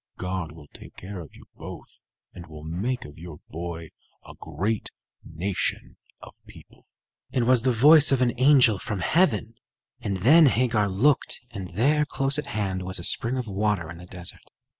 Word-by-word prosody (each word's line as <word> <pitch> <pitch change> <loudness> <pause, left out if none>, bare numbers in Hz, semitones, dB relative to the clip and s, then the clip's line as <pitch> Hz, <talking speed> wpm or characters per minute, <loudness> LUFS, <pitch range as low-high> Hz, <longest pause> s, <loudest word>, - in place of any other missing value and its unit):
God 90 -3 -4
will 80 -2 -14
take - - -14
care 95 +1 -8
of 80 - -12
you - - -14
both, - - -11 0.3
and 85 -1 -11
will 75 -1 -11
make 100 +11 -3
of 75 +2 -13
your 85 -3 -10
boy 85 0 -7 0.4
a - - -11
great 95 +8 -3 0.3
nation 90 +4 -3 0.3
of - - -12
people." - - -17 0.4
It 125 - 0
was 125 0 +3
the 130 - +1
voice 145 +6 +7
of 135 - +3
an 125 -2 +2
angel 130 -7 +5
from 105 -4 -4
heaven; 160 - +1 0.5
and 100 -2 -3
then 150 - +6
Hagar 115 -5 +1
looked, 125 +10 +1
and 95 -5 -7
there, 145 +8 +2
close 135 +1 +1
at 145 - -6
hand, 95 -5 -3
was 95 0 -4
a 85 - -7
spring 120 +8 -1
of 125 - -3
water 100 -4 -2
in 85 - -10
the 90 - -12
desert. 90 -1 -9
105 Hz, 180 wpm, -25 LUFS, 90-130 Hz, 0.5 s, voice